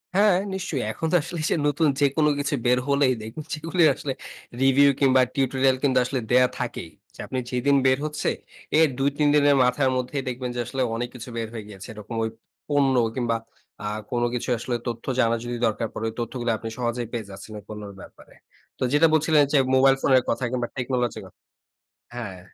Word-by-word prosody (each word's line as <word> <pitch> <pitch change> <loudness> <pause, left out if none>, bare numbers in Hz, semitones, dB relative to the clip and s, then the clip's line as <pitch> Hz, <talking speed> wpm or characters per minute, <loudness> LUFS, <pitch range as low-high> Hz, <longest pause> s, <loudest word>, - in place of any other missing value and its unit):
হ্যাঁ, 200 -2 +5 0.2
নিশ্চয়ই। 180 - -3
এখন 160 - -4
তো - - +3
আসলে 170 -1 -6
যে - - +2
নতুন 150 +2 +2
যেকোন 145 +2 +2
কিছু 145 0 0
বের 125 +1 +4
হলেই 140 -2 +3
দেখবেন, 110 +8 -7
যেগুলি 165 +3 0
আসলে 135 -2 -4 0.5
রিভিউ 135 +1 +5
কিংবা 130 -2 +5
টিউটোরিয়াল 135 -1 +2
কিন্তু 130 -2 +3
আসলে 130 0 -2
দেয়া 125 0 +6
থাকেই। - - -4 0.3
যে - - -19
আপনি 130 - -2
যেদিন 130 +3 +2
বের 130 0 +4
হচ্ছে, 150 0 -1 0.5
এর 160 - +6
২-৩ 145 +2 +1
দিনের 145 -1 +5
মাথার 130 +2 +2
মধ্যে 125 +3 -3
দেখবেন 125 0 -3
যে - - -3
আসলে, 135 -1 -3
অনেক 120 +1 -3
কিছু 125 +1 -8
বের 115 -1 -2
হয়ে 110 -3 -6
গিয়েছে। 100 -1 -10
এরকম 105 +2 -8
ওই 110 - -1 0.4
পণ্য 140 -2 +2 0.2
কিংবা 120 -2 0 0.5
আ - - -1 0.2
কোন 120 -1 0
কিছু 125 - -3
আসলে 120 +1 -3
তথ্য 115 -1 -4
জানা 115 -1 +3
যদি 120 0 -4
দরকার 110 +1 -1
পড়ে, 115 - -4
ওই - - -9
তথ্যগুলি 120 0 -2
আপনি 115 - -6
সহজেই 120 -1 -2
পেয়ে 115 -3 -3
যাচ্ছেন 95 +3 -10
ওই - - -15
পণ্যের 105 -2 -7
ব্যাপারে। - - -15 0.4
তো - - -26
যেটা 160 +3 +6
বলছিলেন 155 -1 +4
যে - - +6 0.2
মোবাইল 135 0 +6
ফোনের 130 -2 +4
কথা 125 - -1
কিংবা 120 -2 -1
টেকনোলজি 125 -2 -1
এর - - -10
কথা - - -22 0.8
হ্যাঁ। 100 -7 -6
130 Hz, 195 wpm, -24 LUFS, 120-140 Hz, 0.8 s, দেয়া